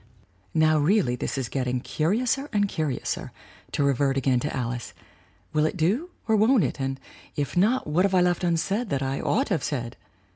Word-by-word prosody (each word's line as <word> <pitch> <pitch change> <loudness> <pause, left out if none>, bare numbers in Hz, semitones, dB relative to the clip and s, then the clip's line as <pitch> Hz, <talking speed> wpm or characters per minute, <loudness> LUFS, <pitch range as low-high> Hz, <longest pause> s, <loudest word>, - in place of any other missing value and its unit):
"(Now, 155 -1 +4
really 160 - +2
this 125 - -3
is 130 -3 -2
getting 125 -1 -1
'curiouser 235 - 0
and 205 -2 +2
curi 155 -8 -2
ouser,' - - -3 0.4
to - - 0
revert 140 0 +2
again 130 -2 +2
to 145 +4 -2
Alice. 120 -2 -4 0.6
Will 155 0 +3
it 170 - -4
do 210 - +1 0.2
or 220 - +3
won't 220 +2 +4
it? - - -2
And, 135 0 -2 0.4
if 145 +3 -2
not, 220 +9 +3
what 155 +4 +2
have 195 -1 +2
I 180 - +5
left 180 +1 +1
unsaid 195 +7 0
that 140 -2 -1
I 135 +1 -2
ought 265 +6 +1
to 210 - -1
have 160 - -1
said? 120 -4 -3
155 Hz, 195 wpm, -25 LUFS, 135-200 Hz, 0.6 s, I